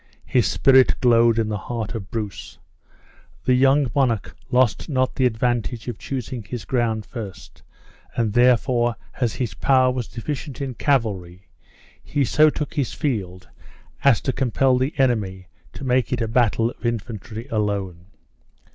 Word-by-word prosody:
His - - +2
spirit 130 -1 +4
glowed 115 -2 +4
in 115 -2 +1
the 105 -1 -2
heart 115 -3 -3
of 100 -5 -6
Bruce. 105 -5 -6 0.9
The 130 - +4
young 135 0 +3
monarch 125 -7 0
lost 125 +2 +2
not 130 -3 +1
the 130 - +2
advantage 120 0 -1
of 120 -4 -5
choosing 130 -2 -5
his 115 +2 -7
ground 115 -4 0
first, 100 -8 -9 0.5
and 115 -3 0
therefore, 120 -1 +3 0.2
as 120 -5 0
his 125 -3 -3
power 130 -2 +3
was 125 -3 -3
deficient 135 +3 -6
in 135 -2 -3
cavalry, 100 -9 -1 0.5
he 140 -2 0
so 155 +5 +5
took 150 0 -4
his 140 -6 -1
field 95 -10 -3 0.6
as 140 -5 +5
to 130 - -1
compel 130 0 +2
the 130 +4 -1
enemy 105 -8 0 0.3
to - - -9
make 130 -1 +1
it 125 - 0
a 115 - -1
battle 115 0 +2
of - - -19
infantry 115 0 -4
alone. 100 -5 -2
120 Hz, 150 wpm, -22 LUFS, 110-130 Hz, 0.9 s, so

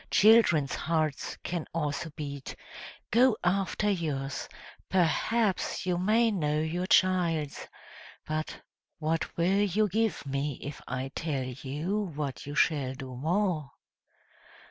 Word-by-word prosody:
Children's 205 -10 +5
hearts 155 -3 -1
can 170 -2 -3
also 160 +1 -2
beat; 140 -3 -6 0.6
go 240 0 +5
after 195 +3 +1
yours, 150 -8 -2 0.4
perhaps 190 +5 +1
you 180 -1 0
may 220 +5 +3
know 150 -6 0
your 170 +4 -1
child's; 170 -6 +2 0.6
but 155 0 -3 0.4
what 160 +1 -2
will 185 +4 +3
you 205 +2 +2
give 220 -1 0
me 140 +1 -1
if 145 +1 -6
I 130 +1 -3
tell 145 -5 -2
you 145 +11 -3
what 145 -2 -4
you 145 - -5
shall 135 -5 +2
do 130 -2 -8
more?" 165 +1 0
165 Hz, 120 wpm, -29 LUFS, 145-190 Hz, 0.6 s, Children's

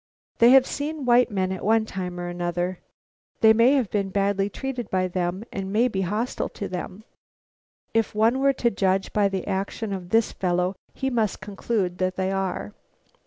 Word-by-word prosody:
They 235 - +7
have 265 0 +7
seen 295 0 -4
white 245 0 +5
men 190 -3 -1
at 190 - -5
one 220 +1 +3
time 180 -3 -5
or 175 - -4
another. 175 +1 -2 0.6
They 220 0 +7
may 230 +4 +5
have 260 -8 +1
been 200 -2 0
badly 200 0 0
treated 250 0 -5
by 185 -1 +1
them 180 +2 -2
and 195 0 -4
may 230 +4 +3
be 195 -6 -2
hostile 210 +7 -2
to 200 - -6
them. 185 +3 -6 0.9
If 225 -2 0
one 225 +4 +3
were 275 0 +3
to 240 -2 +1
judge 190 0 0
by 205 -1 +3
the 190 -2 -3
action 200 +2 -3
of 180 -2 -6
this 225 +3 +2
fellow 180 +1 0 0.2
he 265 0 -2
must 225 -4 0
conclude 195 -2 -2
that 185 0 0
they 190 0 -1
are. 195 +1 -3
200 Hz, 185 wpm, -24 LUFS, 185-230 Hz, 0.9 s, They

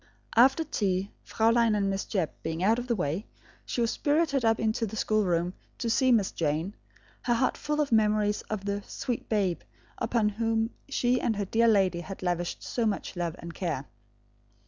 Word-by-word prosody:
After 265 +7 +6
tea, 195 -8 -1
Fraulein 230 0 +2
and 200 -1 +1
Miss 195 0 -1
Jebb 185 -6 -1
being 160 +2 -3
out 225 +4 +3
of 245 - -5
the 235 - +1
way, 175 - -2 0.4
she 240 - -1
was 230 - +2
spirited 290 -3 +1
up 225 -1 +3
into 220 +1 0
the 215 - -7
schoolroom 180 -6 +1 0.2
to 230 - -1
see 260 +2 +3
Miss 215 -5 +3
Jane, 160 +4 -1 0.5
her 240 -2 +1
heart 255 +3 +1
full 300 0 -2
of 290 -3 +1
memories 210 -1 +3
of 205 -2 -3
the 200 0 -1
"sweet 245 -2 -4
babe" 195 -5 +1 0.4
upon 220 -3 +1
whom 225 +1 0 0.2
she 250 -2 +1
and 225 - +1
her 200 0 -2
dear 230 +4 +3
lady 190 -5 +3
had 190 +1 -8
lavished 175 -1 -2
so 235 -2 -1
much 200 -2 -3
love 175 -2 -2
and 170 0 -8
care. 160 -8 -3
215 Hz, 185 wpm, -28 LUFS, 185-235 Hz, 0.5 s, After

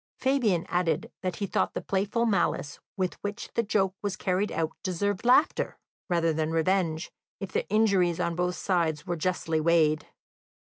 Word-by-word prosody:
Fabian 240 -10 +1
added 175 -2 0
that 185 -2 -2
he 200 - -2
thought - - 0
the - - 0
playful 200 +4 0
malice 195 -8 0 0.2
with 185 -2 -2
which 205 0 -5
the 235 - +2
joke 200 -4 +1
was 200 -2 -2
carried 190 +3 0
out 160 -1 -1
deserved 195 +2 -1
laughter 255 +7 +3 0.3
rather 165 -2 +2
than 155 0 -1
revenge, 165 0 0 0.3
if 195 -2 -6
the - - -2
injuries 195 -5 +3
on 170 -1 0
both 180 +1 0
sides 165 -5 0
were 175 -2 -1
justly 165 -1 -1
weighed. 155 -2 +3
180 Hz, 165 wpm, -28 LUFS, 165-200 Hz, 0.3 s, laughter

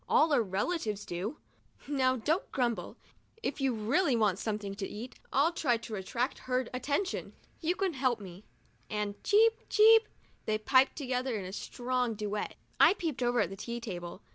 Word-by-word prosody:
All 310 0 +4
our 260 - +5
relatives 210 - -2
do." 195 - -4 0.3
" - - -42 0.2
Now, 260 -3 +2
don't 305 - -1
grumble. 240 -3 -1 0.5
If 280 - -2
you 270 -1 +2
really 255 - +2
want 210 -4 +2
something 210 -3 -3
to 195 -1 -4
eat, 235 +4 -8
I'll 290 +5 +3
try 255 -8 +2
to 225 0 -9
attract 230 +6 -2
her 255 -1 +1
attention. 285 +9 -2 0.3
You 345 +2 0
can 380 -2 0
help 255 -4 +1
me," 190 -1 -10 0.5
and 210 -1 -3
cheep! 450 +2 +4
cheep! 445 +1 +7 0.4
they 215 0 +2
piped 260 +5 +4
together 255 -3 -2
in 195 - -5
a 185 - -7
strong 245 +1 -2
duet. 210 0 -3 0.2
I - - +7
peeped 320 -10 -3
over 245 0 +2
at - - -1
the - - -5
tea 235 +4 -5
table. 180 -4 -7
245 Hz, 175 wpm, -31 LUFS, 210-285 Hz, 0.5 s, cheep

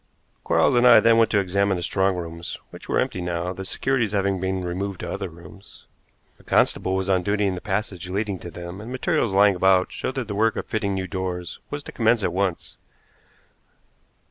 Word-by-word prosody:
Quarles - - +3
and 120 0 +5
I 120 - +9
then 115 0 +4
went 115 -1 +4
to 105 - +2
examine 100 0 +1
the 85 - -4
strong 95 +2 +1
rooms, 85 -1 -6
which - - -12
were - - +1
empty 90 - -1
now, 90 +1 -2
the 95 +1 -7
securities 115 +2 0
having 100 -1 +1
been 95 0 -2
removed 95 +2 -4
to - - -5
other 95 -2 -4
rooms. 85 +4 -15 0.5
A - - -19
constable 95 - +2
was 95 0 -1
on 95 -2 +2
duty 105 +2 0
in 95 - +1
the 90 - -6
passage 95 -3 -3
leading 100 0 -2
to 85 - -8
them, 85 +3 -8
and 115 +3 -8
materials 130 - 0
lying 100 +1 +5
about 95 0 +3
showed 130 - -4
that 130 -4 -3
the 105 - -4
work 110 +2 +2
of - - -4
fitting 100 -3 -2
new 95 -1 -2
doors 90 -1 -4
was 145 0 -5
to - - -9
commence 115 -1 +2
at 85 - 0
once. 95 -2 -2
95 Hz, 210 wpm, -24 LUFS, 90-105 Hz, 0.5 s, I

